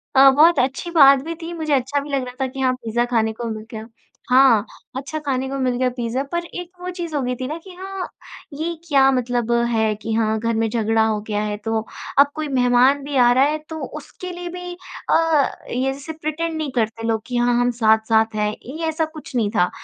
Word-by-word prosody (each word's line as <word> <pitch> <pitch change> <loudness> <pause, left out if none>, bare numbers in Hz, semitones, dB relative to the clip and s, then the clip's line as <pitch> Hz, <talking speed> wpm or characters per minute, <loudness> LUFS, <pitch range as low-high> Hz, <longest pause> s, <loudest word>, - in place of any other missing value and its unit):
अ, 270 +1 +9
बहुत 310 +2 +5
अच्छी 270 +6 -1
बात 275 -4 +7
भी 335 +1 -4
थी। 330 - -6
मुझे 310 -3 -2
अच्छा 275 +2 +1
भी 290 - -9
लग 275 -2 0
रहा 250 0 -9
था - - 0
कि 265 +1 -9
हाँ 255 -1 +2
पिज़्ज़ा 240 -1 -1
खाने 220 -1 +2
को 235 +1 -6
मिल 215 0 -6
गया 220 0 -7 0.4
हाँ, 250 -5 +5 0.3
अच्छा 285 +4 -4
खाने 265 -1 -1
को 275 - -3
मिल 255 -1 +1
गया 255 0 +2
पिज़्ज़ा। 240 +2 -1
पर 345 0 -1
एक 355 0 -7
वो 360 - -4
चीज़ 340 -3 -5
हो 285 - +1
गई 250 0 -1
थी 255 +1 -4
ना, 310 +3 -4
कि 370 +3 -13
हाँ 380 0 -5 0.5
ये 325 +4 -3
क्या 270 -3 +5
मतलब 245 -2 -1 0.2
है 220 -1 +2
कि 220 +1 -5
हाँ 220 -1 +1
घर 230 +1 -1
में 225 0 +1
झगड़ा 225 0 +1
हो 215 -1 0
गया 210 -1 -1
है। 210 0 -3
तो 225 0 -1 0.3
अब 285 0 +6
कोई 310 -1 -3
मेहमान 255 +1 +3
भी 285 0 -5
आ 240 - +5
रहा 260 +2 +4
है 300 +2 +1
तो 320 0 -5 0.2
उसके 360 +5 -9
लिए 350 0 -6
भी 360 0 -7 0.4
अ, 320 -4 +3 0.2
ये 260 +2 0
जैसे 280 +4 -8
प्रिटेंड 315 +1 -3
नहीं 300 -4 -3
करते 225 -1 -1
लोग 220 -1 0
कि 245 -1 -2
हाँ, 240 0 +2
हम 245 0 +2
साथ-साथ 220 -1 +2
हैं, 210 0 +1 0.2
ये 315 +6 -5
ऐसा 320 0 0
कुछ 310 -4 -11
नहीं 220 -4 +1
था। 180 -1 +3
260 Hz, 235 wpm, -21 LUFS, 230-310 Hz, 0.5 s, अ